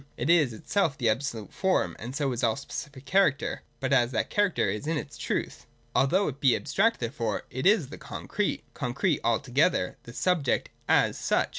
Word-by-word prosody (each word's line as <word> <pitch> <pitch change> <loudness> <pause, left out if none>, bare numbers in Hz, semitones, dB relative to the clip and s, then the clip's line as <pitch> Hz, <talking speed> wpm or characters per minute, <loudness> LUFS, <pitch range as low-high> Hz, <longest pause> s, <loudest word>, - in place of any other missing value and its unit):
It 130 +8 +1
is 155 -7 +4
itself 145 - 0
the 120 -4 +2
absolute 115 -2 -2
form, 190 -1 +1
and 120 +4 -6
so 140 -2 0
is 120 - -3
all 115 -2 +3
specific 140 -1 -7
character, 190 -7 +2 0.2
but 135 0 0
as 120 -3 +4
that 110 - -1
character 205 -4 +2
is 105 +8 -3
in 160 0 0
its 150 - -6
truth. - - -3 0.3
Although 185 +9 +3
it 140 -2 -4
be 130 -3 +5
abstract 220 +10 +1
therefore, 115 -3 -2
it 130 +8 0
is 195 - +4
the - - -9
concrete, - - -3
con - - -4
crete - - +1
altogether, - - +1
the 120 - -12
subject 165 -3 +1 0.2
as - - +3
such. - - +1
140 Hz, 185 wpm, -28 LUFS, 120-175 Hz, 0.3 s, be